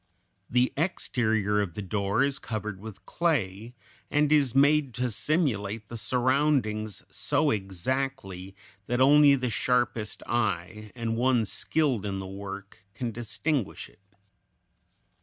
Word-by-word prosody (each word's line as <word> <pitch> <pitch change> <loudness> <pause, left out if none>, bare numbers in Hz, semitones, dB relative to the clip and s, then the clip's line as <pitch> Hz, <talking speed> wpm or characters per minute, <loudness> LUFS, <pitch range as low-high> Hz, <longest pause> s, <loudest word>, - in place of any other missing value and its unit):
The 125 +1 +2
exterior 110 - +1
of 90 -5 -4
the - - -4
door 100 +5 0
is 140 +1 0
covered 105 -5 -5
with 110 -1 -10
clay, 120 - -1 0.3
and 150 0 +2
is 140 -5 +3
made 140 -2 +4
to 125 -1 -1
simulate 110 - 0
the 120 - -6
surroundings 120 -4 0
so 145 +9 +1
exactly 95 -1 -3 0.3
that 125 +1 0
only 145 +1 +7
the 125 -3 -2
sharpest 120 -2 0
eye, 105 -2 -2
and 115 -2 -2
one 125 -2 +3
skilled 135 +1 0
in 100 -2 -3
the 95 - -5
work, 100 +1 -8
can 120 -3 -3
distinguish 120 +3 -2
it. - - -25
115 Hz, 125 wpm, -27 LUFS, 100-135 Hz, 0.3 s, only